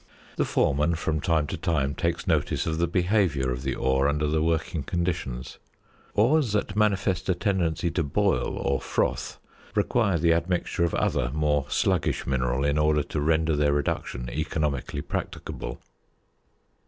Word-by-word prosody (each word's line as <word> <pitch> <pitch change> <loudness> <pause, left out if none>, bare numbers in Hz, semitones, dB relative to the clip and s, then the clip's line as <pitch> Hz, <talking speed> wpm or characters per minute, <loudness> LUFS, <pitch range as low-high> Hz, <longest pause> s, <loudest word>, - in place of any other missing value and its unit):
The - - +2
foreman 75 +4 +2
from 80 -2 -1
time 80 -3 +2
to - - -4
time 70 -4 0
takes 85 +1 -1
notice - - +1
of 80 0 -1
the 85 - +2
behaviour 90 -7 +1
of 60 0 -3
the 65 -1 -2
ore 65 +1 +2
under 75 +1 0
the 80 +1 +1
working 80 +1 0
conditions. 85 -6 -3 0.6
Ores 120 +2 +3
that 105 0 -1
manifest 100 -3 +1
a 90 - +3
tendency 90 -3 0
to 85 - 0
"boil" 70 - 0
or 70 0 0
"froth - - -1 0.2
" - - -25
require 105 -7 +2
the 85 +1 +3
admixture 85 +1 0
of 85 - +1
other - - +1
more 75 -2 +1
sluggish - - +1
mineral 65 0 0
in 70 +1 +2
order 75 -1 +3
to 75 - -3
render 80 +1 +2
their 75 0 +2
reduction 65 -4 -2
economically 75 -1 -2
practicable. - - -5
80 Hz, 155 wpm, -26 LUFS, 70-90 Hz, 0.6 s, Ores